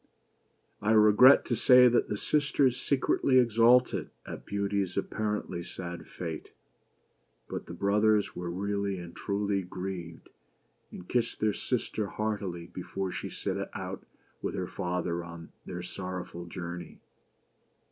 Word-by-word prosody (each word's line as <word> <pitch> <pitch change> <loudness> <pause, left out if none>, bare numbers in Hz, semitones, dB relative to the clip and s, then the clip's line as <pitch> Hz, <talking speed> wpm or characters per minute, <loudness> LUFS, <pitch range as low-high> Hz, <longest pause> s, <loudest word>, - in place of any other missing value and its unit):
I 105 +1 +2
regret 110 +5 +7
to 120 - 0
say 125 +2 +7
that 120 0 +2
the 105 - -1
sisters 140 -1 +2
secretly 135 -1 +2
exulted 120 +1 +4 0.2
at - - -8
Beauty's 100 -2 -1
apparently 105 -3 -2
sad 85 0 -7
fate; 80 -3 -6 1.0
but - - -6
the 85 - -7
brothers 105 +2 +2
were 90 -1 -4
really 100 +2 -2
and 85 -1 -9
truly 100 -1 -1
grieved, 90 -2 -7 0.6
and 90 - -10
kissed 120 -2 0
their 105 -1 +2
sister 110 -3 -2
heartily 100 -5 -3
before 95 +2 -5
she - - -5
set - - -3 0.2
out - - -5 0.4
with - - -3
her - - -2
father 90 -1 -2
on 85 -1 -10 0.2
their 90 -1 -5
sorrowful 90 -2 -6
journey. 85 0 -7
100 Hz, 125 wpm, -29 LUFS, 90-110 Hz, 1.0 s, regret